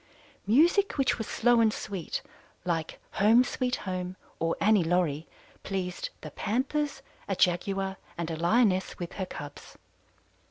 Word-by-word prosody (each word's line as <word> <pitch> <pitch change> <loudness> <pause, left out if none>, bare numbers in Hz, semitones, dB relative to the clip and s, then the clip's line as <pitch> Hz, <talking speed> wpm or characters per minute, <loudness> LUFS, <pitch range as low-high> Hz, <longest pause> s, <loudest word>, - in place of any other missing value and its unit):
"Music 345 - +4
which 270 -3 +2
was 220 - -3
slow 240 0 +3
and 220 -1 +4
sweet, 195 -5 -4 0.4
like 165 -3 -2
'Home, 225 +5 +5
Sweet 250 0 -1
Home' 185 -1 -4 0.2
or 165 0 +1
'Annie 210 -3 +4
Laurie,' 165 -2 +1 0.3
pleased 185 -2 -3
the 155 - -8
Panthers, 270 - -1 0.2
a 195 - 0
Jaguar, 190 +2 +1 0.2
and 170 -1 -2
a - - -2
Lioness 190 +3 +2
with 175 -1 -5
her 190 -2 -3
cubs. 145 -4 -9
195 Hz, 135 wpm, -29 LUFS, 175-240 Hz, 0.4 s, Home